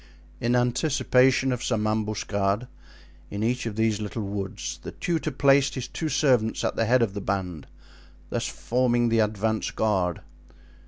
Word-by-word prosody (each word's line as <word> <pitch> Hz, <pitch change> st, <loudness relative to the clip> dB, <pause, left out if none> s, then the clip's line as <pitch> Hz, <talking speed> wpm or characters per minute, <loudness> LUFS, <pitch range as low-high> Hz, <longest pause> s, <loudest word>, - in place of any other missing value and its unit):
In 120 Hz, +1 st, +1 dB
anticipation 130 Hz, +1 st, +3 dB
of 125 Hz, -1 st, -2 dB
some 110 Hz, -3 st, 0 dB
ambuscade 105 Hz, 0 st, -1 dB, 0.6 s
in 100 Hz, +1 st, -3 dB
each 120 Hz, +1 st, 0 dB
of 110 Hz, -, -4 dB
these 110 Hz, -1 st, +1 dB
little 105 Hz, +1 st, -4 dB
woods 100 Hz, -1 st, -4 dB
the -, -, -8 dB
tutor 165 Hz, -3 st, -1 dB
placed 140 Hz, 0 st, +3 dB
his 130 Hz, -2 st, -4 dB
two 160 Hz, -, -3 dB
servants 125 Hz, -8 st, +2 dB
at -, -, -1 dB
the 115 Hz, -, +1 dB
head 125 Hz, +2 st, +4 dB
of 100 Hz, -4 st, -1 dB
the 100 Hz, -, -4 dB
band, 95 Hz, -6 st, -3 dB, 0.6 s
thus -, -, -1 dB
forming 120 Hz, -1 st, +1 dB
the 115 Hz, 0 st, +2 dB
advance 110 Hz, 0 st, 0 dB
guard. 95 Hz, -6 st, 0 dB
115 Hz, 155 wpm, -26 LUFS, 105-125 Hz, 0.6 s, head